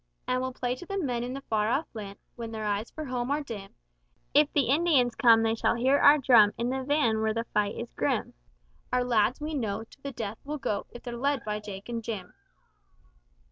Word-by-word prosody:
And 255 0 +1
we'll 260 0 -2
play 250 -1 -2
to 355 - -9
the 395 - -3
men 250 -9 -1
in 250 +2 -4
the 275 - -6
far 215 -4 0
off 275 +7 +1
land, 200 -3 -7 0.2
When 230 -2 -6
their 220 -1 -4
eyes 205 +2 -1
for 310 - -7
home 250 -1 -2
are 290 +1 0
dim; 205 -7 -8 0.6
If 290 0 +5
the 290 - +3
Indians 280 -5 +3
come, 230 -2 +5
they 225 0 +2
shall 225 - +1
hear 260 +4 +3
our 290 +1 +7
drum 235 -7 +6
In 235 +2 -1
the 265 0 -2
van 255 -6 +2
where 220 0 0
the 230 - 0
fight 205 -1 +1
is - - -6
grim. - - -1 0.6
Our 250 0 +2
lads 235 0 +2
we 305 +1 -4
know, 220 -6 -2
to 255 +4 -19
the 280 - -5
death 225 -3 -5
will 300 +2 -4
go, 210 -7 -2
If 240 - -12
they're 240 -1 -5
led 275 +1 -1
by 210 0 -2
Jake 200 -2 -8
and 235 -1 -4
Jim.' 205 -5 -5
240 Hz, 225 wpm, -28 LUFS, 220-275 Hz, 0.6 s, our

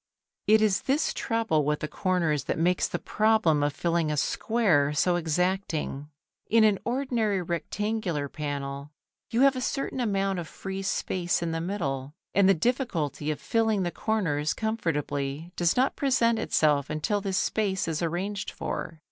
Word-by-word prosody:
It 215 0 +6
is 205 -3 +2
this 285 +4 +1
trouble 225 - 0
with 150 +1 0
the 150 - -2
corners 165 -3 0
that - - -1
makes 175 +2 +2
the - - -3
problem 215 -9 +2
of 145 0 +1
filling 165 0 0
a 150 - -1
square 165 -5 +2
so 175 +4 +2
exacting. 170 -3 -1 0.4
In 225 0 +5
an 210 -3 +4
ordinary 235 -5 0
rectangular 175 -1 -2
panel 140 -1 -5 0.4
you 230 +2 +1
have 275 0 +5
a 255 - -3
certain 275 0 -2
amount 195 -5 0
of 170 - -5
free 195 +3 -6
space 180 -2 -1
in 165 - -1
the 165 0 -2
middle, 145 -7 -3 0.2
and 195 -1 +5
the 195 - +6
difficulty 170 - -1
of 150 - -2
filling 220 -3 +1
the 175 - -1
corners 165 -11 0
comfortably 155 -7 -2
does 175 +3 +1
not 260 +2 +2
present 235 -4 +2
itself 145 -3 +2
until 155 +7 -1
this 195 -2 -1
space 195 -5 0
is 160 0 -2
arranged 185 +5 -2
for. 160 -2 -5
180 Hz, 160 wpm, -27 LUFS, 150-220 Hz, 0.4 s, It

